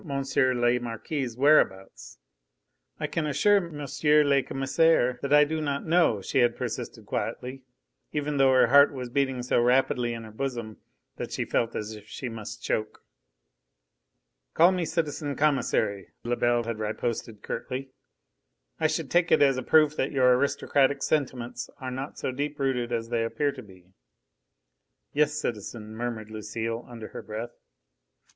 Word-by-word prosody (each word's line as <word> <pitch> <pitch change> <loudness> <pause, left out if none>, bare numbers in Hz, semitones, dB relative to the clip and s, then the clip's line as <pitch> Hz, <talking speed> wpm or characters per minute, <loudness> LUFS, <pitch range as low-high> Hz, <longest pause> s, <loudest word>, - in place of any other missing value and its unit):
le 130 -4 +1
Marquis' 120 +2 -4
whereabouts. 130 -9 +2 0.8
"I - - -1
can 160 -2 -2
assure 205 +8 +4
M. 170 -6 -4 0.5
le 140 -1 +4
Commissaire 135 -1 +2
that 140 - -3
I 150 0 +7
do 155 +1 -2
not 140 -2 -2
know," 165 - +3
she - - 0
had 120 -1 +3
persisted - - -5
quietly, 130 +2 -4 0.5
even 150 -1 -2
though 135 -1 +5
her 130 -1 +6
heart 140 +4 +6
was 125 -2 -5
beating 135 -2 0
so 120 - +2
rapidly 125 -1 +2
in 115 - -7
her 110 - -10
bosom 120 -2 -4 0.4
that - - -5
she - - -2
felt 115 0 -1
as 105 +1 -4
if 105 -1 -12
she 130 - -6
must 110 -2 -8
choke. 110 0 -2 1.5
"Call 170 +3 +6
me 180 -2 -1
citizen 150 -3 -2
Commissary," 120 -9 0
Lebel 120 0 +1
had 115 -1 -4
riposted 110 0 -3
curtly. 130 +3 -5 0.9
"I - - +3
should - - -3
take 175 -1 +3
it - - +6
as 135 -2 +4
a - - -1
proof 155 0 +4
that 135 - 0
your 125 -2 +4
aristocratic 140 +1 +1
sentiments 125 -4 -2
are 130 -1 -6
not 135 +3 -6
so - - -2
deep 145 +3 -4
rooted 125 -3 -1
as 115 -1 -2
they 115 -1 0
appear 115 +6 0
to 135 - -9
be." 95 -3 -18 1.2
"Yes, 150 0 +2
citizen!" 110 -5 -5
murmured 110 -2 -4
Lucile, 110 +2 -4
under 115 -3 -8
her - - -8
breath. 110 +3 -6
130 Hz, 155 wpm, -27 LUFS, 115-145 Hz, 1.5 s, I